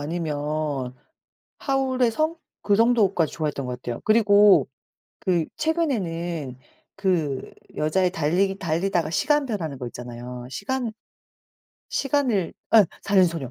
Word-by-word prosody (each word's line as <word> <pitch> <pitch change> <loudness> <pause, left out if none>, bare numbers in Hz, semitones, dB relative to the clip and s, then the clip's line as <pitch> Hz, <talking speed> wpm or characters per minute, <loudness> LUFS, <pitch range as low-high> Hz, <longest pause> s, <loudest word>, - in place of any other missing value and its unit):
아니면 150 -4 -3 0.6
하울의 260 -3 +1
성 315 +7 0 0.3
그 205 - +6
정도까지 210 -8 +3
좋아했던 150 -3 -3
것 125 -1 -5
같아요. 120 -1 -5
그리고 205 - +6 0.5
그 175 -4 +1
최근에는 175 - -2 0.4
그 170 -9 -1 0.2
여자애 180 +4 +1
달리기 185 +4 0
달리다가 170 -2 0
시간 295 - +2
변하는 170 - -3
거 125 - -6
있잖아요. 120 +1 -8
시간 245 - -3 1.0
시간을 260 - 0 0.2
예 210 -5 +8 0.2
사는 195 -1 +4
소녀. 165 -7 -2
175 Hz, 260 characters per minute, -24 LUFS, 150-220 Hz, 1.0 s, 예